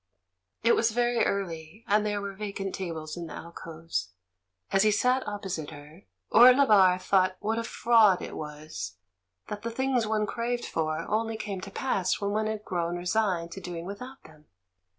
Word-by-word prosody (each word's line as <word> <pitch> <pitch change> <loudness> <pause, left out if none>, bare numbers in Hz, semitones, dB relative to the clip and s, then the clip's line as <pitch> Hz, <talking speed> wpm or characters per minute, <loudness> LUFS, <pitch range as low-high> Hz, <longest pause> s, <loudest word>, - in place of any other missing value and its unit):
It 235 - +5
was 230 - +3
very 240 +1 +1
early, 180 0 -4
and 210 +1 +3
there 205 -1 -1
were 200 0 -5
vacant 195 -1 -5
tables 160 -4 -5
in 170 -1 -6
the - - -8
alcoves. 165 - -6 0.6
As 195 - +4
he 215 - +5
sat 250 +5 +2
opposite 190 -7 -4
her, 150 +6 -13 0.3
Orlebar 220 -7 +7
thought 185 -1 +2
what 220 +2 -1
a - - -2
fraud 225 -5 +4
it - - -7
was 150 - -7 0.5
that 205 - -5
the 230 - -3
things 250 -1 0
one 215 -1 +1
craved 240 +2 -2
for 155 -1 -2
only 225 +1 -1
came 200 -3 -5
to 195 - -7
pass 195 -4 -1
when 200 0 -1
one 215 +1 0
had 215 -1 -4
grown 175 -1 -2
resigned 180 -2 0
to 195 - -7
doing 175 -2 -6
without 250 +8 -8
them. 155 -1 -18
200 Hz, 170 wpm, -28 LUFS, 170-220 Hz, 0.6 s, Orlebar